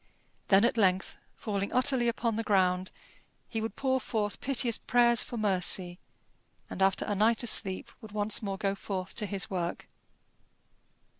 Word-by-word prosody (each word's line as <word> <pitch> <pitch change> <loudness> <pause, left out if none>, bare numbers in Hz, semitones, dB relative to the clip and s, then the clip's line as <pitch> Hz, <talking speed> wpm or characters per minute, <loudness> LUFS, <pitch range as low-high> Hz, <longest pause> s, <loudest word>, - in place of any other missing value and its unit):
Then 200 +3 +5
at 235 - +1
length, 190 -3 +2 0.2
falling 200 -2 -3
utterly 255 -1 +3
upon 230 -1 -1
the 225 - -1
ground, 185 -3 +1 0.6
he 225 -2 -3
would 220 -1 -4
pour 260 -1 0
forth 210 -4 -3
piteous 250 -4 +1
prayers 240 -1 +3
for 240 - -5
mercy, 185 -3 0 0.7
and, - - -5
after 195 0 +2
a 205 - -1
night 220 +4 +2
of 240 - +1
sleep, 190 -1 +2
would 220 - -11
once 210 0 -1
more 195 -2 -3
go 195 0 -1
forth 190 -2 -5
to 210 - -2
his 200 0 -4
work. 175 -2 -3
205 Hz, 160 wpm, -29 LUFS, 190-230 Hz, 0.7 s, Then